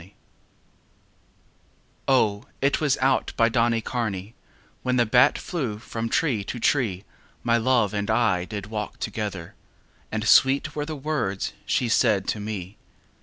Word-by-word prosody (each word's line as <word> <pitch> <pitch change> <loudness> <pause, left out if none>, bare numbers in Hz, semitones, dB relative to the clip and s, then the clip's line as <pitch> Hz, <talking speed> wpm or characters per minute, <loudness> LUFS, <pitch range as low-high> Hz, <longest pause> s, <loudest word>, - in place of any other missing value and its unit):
XXXI 95 +4 -17 1.9
O, 110 -6 +2
it 140 +3 +1
was 145 -4 +2
out 130 0 +2
by 115 0 +4
Donnycarney 115 -3 -1 0.5
When 125 0 0
the 120 -1 +3
bat 125 +3 +4
flew 130 - -3
from 115 +1 -5
tree 120 -6 +1
to 120 - -5
tree 110 -8 +1 0.4
My 115 0 +3
love 115 -3 +2
and 105 0 -2
I 110 -6 +2
did 100 -1 -6
walk 105 0 -5
together; 100 -6 -5 0.6
And 110 0 -2
sweet 140 +3 +4
were 150 0 -3
the 155 - -4
words 135 -10 -2
she 125 - +1
said 105 -3 +2
to 110 - -1
me. 105 -2 -6
115 Hz, 140 wpm, -25 LUFS, 105-130 Hz, 1.9 s, by